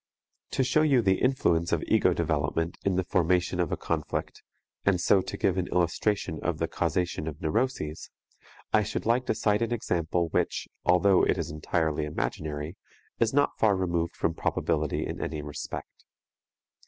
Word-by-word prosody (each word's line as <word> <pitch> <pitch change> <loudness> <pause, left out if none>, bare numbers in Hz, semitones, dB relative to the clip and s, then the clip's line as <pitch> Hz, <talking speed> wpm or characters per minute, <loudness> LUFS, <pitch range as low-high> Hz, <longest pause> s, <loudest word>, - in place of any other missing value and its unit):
To 135 - +2
show 155 +4 +3
you 140 -6 +4
the 95 -1 +3
influence 85 -11 +2
of - - +1
ego - - +4
development 80 +1 -1
in 100 -2 +1
the 95 - +1
formation 90 0 +1
of 85 -3 0
a - - 0
conflict, - - -3 0.4
and 95 -3 +2
so 95 +2 +4
to - - -6
give 95 -1 +1
an 90 - -1
illustration 90 0 0
of 85 -3 -1
the 80 - -1
causation 85 -1 -1
of 75 -1 -5
neuroses, 80 -4 -2 0.6
I 105 - +5
should 105 +1 -3
like 120 +3 +2
to - - +1
cite 105 -1 +1
an 115 0 0
example 85 -6 0
which, - - -1 0.2
although 90 +1 +4
it - - +2
is - - -3
entirely 75 0 -1
imaginary, 75 +2 -4 0.4
is 115 -1 +3
not 145 +1 +1
far 105 -3 +4
removed 85 -2 -1
from 80 - 0
probability 75 -1 -1
in - - -5
any 75 0 -3
respect. 75 0 -7
90 Hz, 165 wpm, -28 LUFS, 80-105 Hz, 0.6 s, I